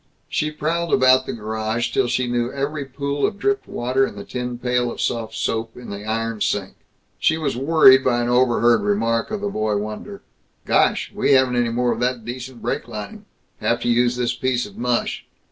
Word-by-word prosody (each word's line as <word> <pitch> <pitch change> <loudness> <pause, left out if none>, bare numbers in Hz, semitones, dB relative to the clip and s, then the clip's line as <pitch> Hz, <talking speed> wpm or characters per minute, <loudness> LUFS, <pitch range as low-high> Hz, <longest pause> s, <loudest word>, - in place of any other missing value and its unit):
She 155 - -1
prowled 165 +3 -2
about 130 0 +4
the - - -3
garage 110 +1 -2
till 130 - +1
she 125 +1 0
knew 120 0 -1
every 140 +1 -3
pool 140 +1 -3
of 205 - +1
dripped 405 - 0
water 130 +2 0
in 120 - -2
the 100 - -7
tin 125 -1 -4
pail 125 0 0
of - - -9
soft 115 -2 -2
soap 115 0 -2
in 125 -3 -9
the 100 +1 -7
iron 115 0 -2
sink. 95 -2 -1 0.5
She 160 - +2
was 150 -5 -2
worried 135 -1 +6
by 120 -2 +2
an - - -1
overheard 120 -2 +3
remark 115 +3 0
of 215 -1 -4
the 205 - -1
boy 110 - -1
wonder, 110 - -6 0.4
"Gosh, - - +2
we - - +2
haven't 130 -2 +4
any 120 -1 +1
more 120 +1 +1
of 115 - -2
that 125 -2 -1
decent 125 0 -7
brake 120 - -2
lining. 120 - -8 0.3
Have 120 - +1
to - - 0
use 120 +1 +3
this 125 -1 0
piece 125 0 -1
of 100 - -12
mush." 120 0 -1
125 Hz, 200 wpm, -21 LUFS, 115-130 Hz, 0.5 s, worried